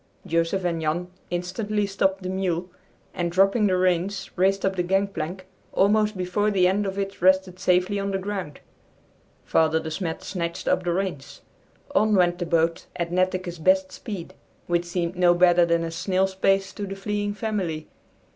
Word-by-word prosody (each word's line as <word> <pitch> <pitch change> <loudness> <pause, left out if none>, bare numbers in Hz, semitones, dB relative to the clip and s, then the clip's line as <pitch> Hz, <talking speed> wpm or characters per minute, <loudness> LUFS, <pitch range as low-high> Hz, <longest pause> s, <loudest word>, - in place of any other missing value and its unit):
Joseph 165 +3 0
and 170 -2 -1
Jan 170 +3 -2 0.2
instantly 205 +4 -1
stopped 195 -1 0
the 185 - -3
mule 185 -2 -2 0.4
and, 175 -2 -2
dropping 195 +4 +3
the 185 -1 +2
reins, 185 +1 0
raced 195 +2 +2
up 190 0 0
the 180 - +1
gangplank, 185 -1 -1 0.3
almost 210 +1 +3
before 185 +3 0
the 190 -3 +3
end 200 +2 +1
of 195 0 -4
it 195 -2 -4
rested 185 0 +3
safely 185 +2 +2
on 200 0 -2
the 195 - 0
ground. 190 -6 -5 0.8
Father 160 0 +3
De 160 0 -6
Smet 165 0 -4
snatched 170 -3 -4
up - - +2
the 175 - 0
reins. 170 -7 -3 0.5
On 215 0 +3
went 175 -2 +3
the 175 - -2
boat 165 0 +1
at 170 -1 -3
Netteke's 185 -1 -1
best 185 +3 +3
speed, 195 -6 -7 0.3
which 175 0 0
seemed 175 0 -2
no 175 -1 +4
better 175 -1 +5
than 170 0 +2
a 165 - -3
snail's 190 +3 0
pace 195 +1 +1
to 205 -1 -5
the 195 - -5
fleeing 205 +1 -2
family. 190 -8 -3
185 Hz, 175 wpm, -25 LUFS, 175-195 Hz, 0.8 s, better